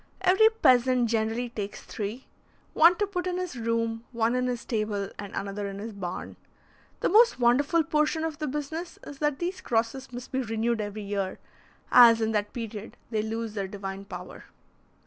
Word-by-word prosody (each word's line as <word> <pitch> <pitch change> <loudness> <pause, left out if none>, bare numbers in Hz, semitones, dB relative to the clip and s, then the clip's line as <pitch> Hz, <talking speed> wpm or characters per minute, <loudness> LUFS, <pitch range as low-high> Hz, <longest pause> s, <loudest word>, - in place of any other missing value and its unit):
Every 385 +5 +6
peasant 255 - +3
generally 225 +2 0
takes 205 -3 -6
three: 220 +5 -5 0.5
one 335 +3 +7
to 415 - 0
put 370 -2 -3
in 360 0 -1
his 365 -5 -4
room, 230 -1 -1
one 230 -1 +1
in 250 0 +1
his 245 -1 -2
stable, 210 -3 -2
and 200 -1 -6
another 200 +1 -3
in 195 0 -6
his 215 +2 -6
barn. 185 -3 -6 0.6
The - - +2
most 455 - +5
wonderful 280 +7 +3
portion 305 0 +1
of 320 -2 -3
the 305 - -2
business 300 +5 -4
is 285 -1 -9
that 295 -2 +1
these 370 +2 -3
crosses 235 +3 -1
must 245 0 -8
be 265 - 0
renewed 225 -1 -1
every 205 0 -5
year, 200 -2 -2 0.5
as 235 -2 +8
in 220 0 0
that 210 -1 -1
period 225 -2 -7
they 215 -2 +1
lose 225 0 -4
their 200 -2 -3
divine 195 0 -6
power. 200 - -9
235 Hz, 180 wpm, -27 LUFS, 215-295 Hz, 0.6 s, as